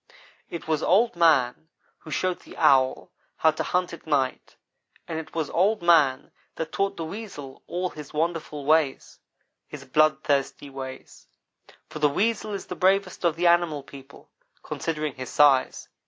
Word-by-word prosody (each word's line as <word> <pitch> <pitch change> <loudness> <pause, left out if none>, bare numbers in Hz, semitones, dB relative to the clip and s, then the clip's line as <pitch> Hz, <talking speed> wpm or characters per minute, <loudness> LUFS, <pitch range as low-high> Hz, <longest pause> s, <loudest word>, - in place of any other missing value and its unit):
"It 170 - -7
was 155 -2 0
Old 225 +5 +3
man 160 -3 +2 0.3
who 160 - -13
showed 185 +3 -1
the - - -14
Owl 130 -1 +3 0.3
how 160 - +4
to 155 - -5
hunt 180 -1 -1
at 170 - -11
night 135 -4 -1 0.5
and 160 -1 -3
it 160 - -10
was 160 -3 -2
Old 200 +3 +1
man 155 -6 +3 0.2
that 160 0 -5
taught 195 0 -1
the 165 - -4
Weasel 160 -8 -8
all 180 +1 -3
his 150 -2 -10
wonderful 155 -2 -3
ways 155 -2 +1 0.5
his 140 -2 -10
bloodthirsty 145 -1 +1
ways 130 -1 -9 0.6
for 155 - -8
the 150 -1 +4
Weasel 215 +6 -1
is 195 - -5
the - - -6
bravest 190 0 +1
of 170 -2 +2
the 175 +1 -1
animal 170 -4 +3
people, 140 0 -14 0.3
considering 155 -3 -3
his 130 -1 -7
size. 140 -3 +3
160 Hz, 155 wpm, -25 LUFS, 140-175 Hz, 0.6 s, how